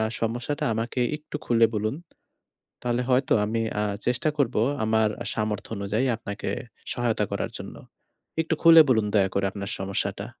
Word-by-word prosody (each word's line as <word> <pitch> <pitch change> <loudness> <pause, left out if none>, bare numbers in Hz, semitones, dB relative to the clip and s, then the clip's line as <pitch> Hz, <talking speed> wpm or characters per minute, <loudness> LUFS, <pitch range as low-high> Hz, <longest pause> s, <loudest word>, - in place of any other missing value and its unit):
আ - - +2 0.2
সমস্যাটা 120 +7 -2
আমাকে 115 +3 -2 0.2
একটু 150 0 -7
খুলে 115 -1 +5
বলুন। 110 +6 -1 0.9
তাহলে 120 0 0
হয়তো 130 +2 +3
আমি 115 +2 -1 0.2
আ - - +1 0.2
চেষ্টা 125 +5 +1
করবো 125 -5 +2 0.2
আমার 110 0 +3 0.3
সামর্থ্য 105 -1 -2
অনুযায়ী 105 +6 0
আপনাকে 100 -2 -6 0.4
সহায়তা 115 -3 0
করার - - -2
জন্য। - - -8 0.7
একটু 160 0 0
খুলে 165 -1 +9
বলুন 110 -4 +3
দয়া 95 -2 +4
করে 100 0 +1
আপনার 100 -1 -5
সমস্যাটা। 100 +1 -2
115 Hz, 150 wpm, -26 LUFS, 105-125 Hz, 0.9 s, খুলে